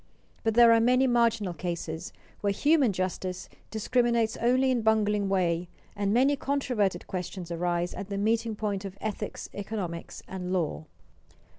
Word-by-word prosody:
But 225 -1 +1
there 235 -1 +8
are 230 - +5
many 250 +3 +4
marginal 230 -6 +2
cases 170 0 -4 0.3
where 205 - +1
human 285 +3 +3
justice 185 0 -3 0.2
discriminates 235 0 +1
only 255 +2 +3
in 250 - +2
a - - -2
bungling 210 -2 +2
way, 175 -2 +1 0.3
and 200 -1 0
many 265 +6 +4
controverted 250 -10 -1
questions 180 -1 -5
arise 175 +1 -1
at 195 - -7
the 200 - -3
meeting 225 +2 +1
point 205 -2 -2
of 195 0 -7
ethics, 215 -1 -4
economics, 195 -5 -5
and 180 -1 -5
law. 160 -3 -1
205 Hz, 150 wpm, -28 LUFS, 185-235 Hz, 0.3 s, there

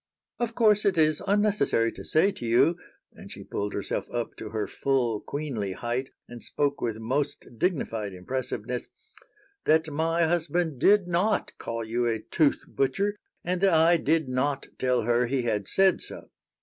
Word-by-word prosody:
"Of 235 -1 -2
course, 210 -3 +4
it 195 -3 +2
is 155 -1 +3
unnecessary 200 - +2
to - - -10
say 175 +6 +3
to - - -9
you," 125 +8 +4 0.4
and - - -12
she - - -8
pulled 100 0 -4
herself 100 - -3
up 120 -1 -3
to 110 - -7
her 110 -1 -2
full 120 0 0
queenly 125 -10 -4
height 120 +5 -3 0.2
and 120 -1 -10
spoke 145 -1 -1
with 115 -2 -1
most 135 +6 -2
dignified 115 - -1
impressiveness, 120 +4 -4 0.8
"that 160 0 +3
my 165 +3 +1
husband 165 -3 0
did 200 +4 +5
not 180 +5 0
call 115 0 -4
you 120 +2 0
a 115 -1 +1
'tooth 145 +6 +1
butcher' 200 +9 0 0.3
and 180 +1 -1
that 195 -4 +4
I 165 +2 +5
did 160 -1 +1
not 135 +2 -1
tell 125 -2 +1
her 120 +2 +2
he 130 0 0
had 105 -4 -1
said 190 -2 +3
so. - - -9
140 Hz, 165 wpm, -27 LUFS, 120-170 Hz, 0.8 s, did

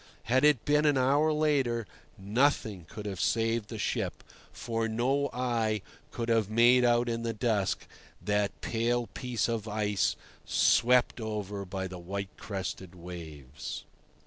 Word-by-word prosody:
Had 130 +3 +2
it 150 -6 +4
been 150 +1 +3
an 145 -2 +4
hour 140 +4 +3
later, 140 -7 +1 0.3
nothing 105 - +1
could 105 0 -8
have 95 -3 -3
saved 115 -1 +1
the 115 - -5
ship, 105 - -2 0.3
for 115 -1 -2
no 130 +6 +1
eye 115 -4 0 0.3
could 115 - -4
have 115 -3 +2
made 120 +3 +5
out 120 0 +3
in 115 0 -1
the 115 0 -2
dusk 105 -4 0 0.3
that 105 -1 -1
pale 120 +1 0
piece 120 -2 -2
of 115 -2 -2
ice 105 -2 0 0.3
swept 125 0 +3
over 105 -2 -4
by 95 +1 -4
the 90 -1 -8
white 95 +2 -5
crested 95 -3 -5
waves. 80 -6 -8
115 Hz, 145 wpm, -30 LUFS, 100-125 Hz, 0.3 s, made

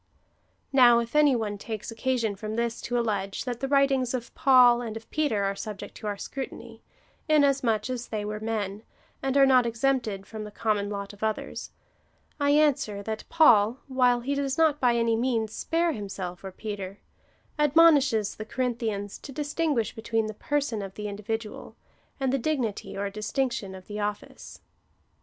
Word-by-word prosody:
Now 245 -3 +7
if 235 +3 -2
any 295 -3 +5
one 210 -3 -3
takes 220 0 -6
occasion 230 -3 -1
from 215 +2 -5
this 235 0 -2
to 245 - -2
allege, 200 -3 -2
that 245 -2 -3
the 270 - -2
writings 275 -3 +2
both 250 -2 -1
of - - -38
Paul 250 -3 +6
and 225 -2 -5
of 225 - -12
Peter 285 -10 +1
are 195 0 0
subject 210 0 -7
to 215 - -6
our 205 -1 -2
scrutiny, 235 -2 -7 0.5
inasmuch 275 -8 +3
as 250 -2 -4
they 210 -2 -3
were 210 0 -4
men, 215 -2 -3 0.4
and 270 +1 0
are 275 - +7
not 255 -2 +5
exempted 230 -4 -1
from 220 0 -7
the 210 - -7
common 205 -1 -1
lot 200 0 -5
of 205 - -16
others, 220 -1 -3 0.7
I 285 0 +2
answer, 285 -9 +2
that 220 +1 -5
Paul, 235 -8 +5
while 250 -2 +3
he 275 +4 -2
does 280 -1 -1
not 315 -3 +3
by 245 -2 +3
any 230 -1 +2
means 225 -2 0
spare 335 +1 0
himself 195 - -6
or 190 - -6
Peter, 200 -1 -6 0.6
admonishes 290 -8 +4
the 215 - -7
Corinthians 220 -4 -3
to 280 - -10
distinguish 290 -3 -1
between 225 0 -1
the 215 - -4
person 275 -2 -1
of 195 -1 -7
the 210 0 -5
individual, 210 +2 -5 0.4
and 265 -1 0
the 275 - +2
dignity 240 -9 -2
or 200 0 -2
distinction 215 -1 -2
of 185 +2 -12
office. 210 0 -5
230 Hz, 170 wpm, -27 LUFS, 210-265 Hz, 0.7 s, Now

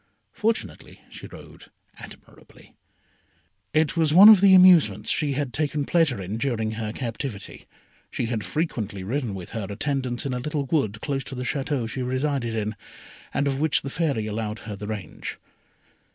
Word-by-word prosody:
Fortunately 225 +1 -3
she - - -9
rode - - -13 0.3
admirably. - - -15 1.0
It 155 -1 +1
was 160 -2 +2
one 200 +4 +11
of 210 -4 +8
the 195 -1 +7
amusements 160 - +6
she 150 -2 0
had 135 -2 -3
taken 150 -1 -1
pleasure 160 - +2
in 95 +3 -4
during 115 -4 -1
her 110 -1 -4
captivity. 115 -3 -6 0.4
She - - -3
had 115 -2 -2
frequently 105 - -3
ridden 115 0 -2
with 90 -2 -8
her 110 -4 -4
attendants 130 +3 -2
in 135 - -2
a 125 - -2
little 145 +2 -3
wood 110 -8 -1
close 135 -2 -2
to 135 - -7
the 125 - -4
Château 135 -2 -2
she 130 +3 -5
resided 130 -2 -1
in, 110 -1 -2 0.6
and 140 - 0
of 135 -1 -1
which 155 -3 +1
the 135 - -5
Fairy 145 -10 -1
allowed 110 0 -3
her 105 -2 -5
the 105 +1 -7
range. 105 -3 -6
130 Hz, 165 wpm, -24 LUFS, 110-150 Hz, 1.0 s, one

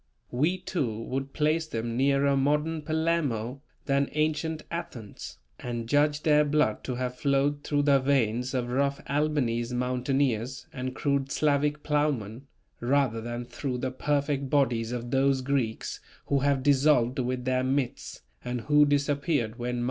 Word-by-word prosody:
We 155 +9 +1
too, 145 - -3
would 135 +2 -3
place 155 +2 +1
them 115 -4 -3
nearer 140 +2 +3
modern 150 +4 +1
Palermo 150 -6 -1 0.2
than 140 0 +1
ancient 155 +1 -1
Athens, 105 - -7 0.2
and 120 -2 -4
judge 145 +3 +2
their 150 -1 +5
blood 145 -7 +1
to 125 - -3
have 125 0 -4
flowed 145 +1 +1
through 145 -1 +1
the 140 -1 +5
veins 130 -2 +1
of 120 -1 -1
rough 140 +2 +1
Albanese 125 -5 0
mountaineers 125 0 -1
and 130 -2 -4
crude 140 -1 0
Slavic 150 0 +1
plowmen, 140 -5 -1 0.3
rather 125 -2 +1
than 120 +1 -5
through 125 +2 -4
the 130 +1 -2
perfect 140 0 -1
bodies 125 -5 +1
of 120 -1 -4
those 135 0 +2
Greeks 130 -4 -2 0.3
who 140 - +1
have 140 -1 +1
dissolved 135 -3 +3
with 125 0 -2
their 130 0 +1
myths, 130 -1 -2 0.2
and 125 -1 -3
who 150 +4 +5
disappeared 140 -4 0
when 125 +1 -2
Mt. - - -2
135 Hz, 150 wpm, -28 LUFS, 125-145 Hz, 0.3 s, their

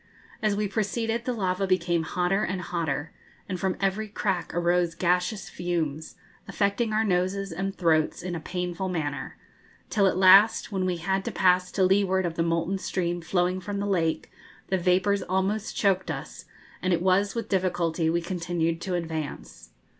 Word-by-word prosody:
As 215 -2 +1
we 210 0 0
proceeded 225 +3 -1
the 255 - 0
lava 195 -3 -1
became 175 -2 +1
hotter 180 +4 0
and 185 -2 -2
hotter, 160 -4 -3 0.4
and 185 -1 -4
from 190 0 -1
every 195 +2 0
crack 195 -4 -2
arose 175 0 +1
gaseous 180 +4 0
fumes, 160 -4 -3 0.3
affecting 210 +3 0
our 215 +1 +2
noses 190 0 0
and 195 +3 -3
throats 160 -3 +1
in 180 -1 -4
a 170 - -3
painful 180 +2 -3
manner; 150 -5 -3 0.5
till 200 -3 +3
at 185 - +1
last, 195 +5 +6
when 190 -2 -1
we 180 -1 -1
had 190 +3 -1
to - - -2
pass 180 0 +3
to 190 - +2
leeward 190 0 +3
of 170 - -2
the 165 - -2
molten 170 +3 0
stream 175 -2 -2
flowing 180 +2 0
from 205 +1 -4
the 200 - -2
lake, 170 -5 0 0.4
the 190 - +2
vapours 185 +3 +2
almost 195 +3 -1
choked 195 -2 +1
us, - - -6 0.4
and 185 0 +1
it 170 - +1
was 195 +3 +2
with 230 -2 -3
difficulty 175 -4 0
we 170 +1 +1
continued 170 -1 -2
to 185 -2 -2
advance. 155 - -5
185 Hz, 170 wpm, -26 LUFS, 170-195 Hz, 0.5 s, last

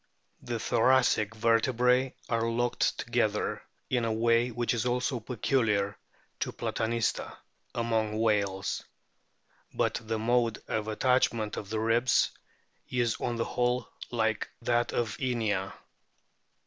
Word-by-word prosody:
The 120 -1 -3
thoracic 115 -2 +3
vertebrae 125 +3 +2
are 115 -1 0
locked 120 +1 0
together 115 -3 0 0.3
in 125 -2 0
a 115 - 0
way 115 +2 +3
which 120 0 -1
is 115 - 0
also 125 +1 0
peculiar 110 -5 0 0.4
to - - -1
Platanista 115 0 -2 0.4
among 110 -2 0
whales; 100 -3 0 0.9
but - - 0
the 110 0 -2
mode 115 0 +1
of 110 -1 -2
attachment 115 -1 +1
of 100 - -6
the 110 0 -1
ribs 115 +3 +3 0.6
is 120 -2 0
on 120 - -1
the 115 - -1
whole 125 0 0 0.2
like 110 -3 0
that 120 0 +1
of 115 -4 -1
Inia. 110 -7 0
115 Hz, 120 wpm, -29 LUFS, 110-120 Hz, 0.9 s, thoracic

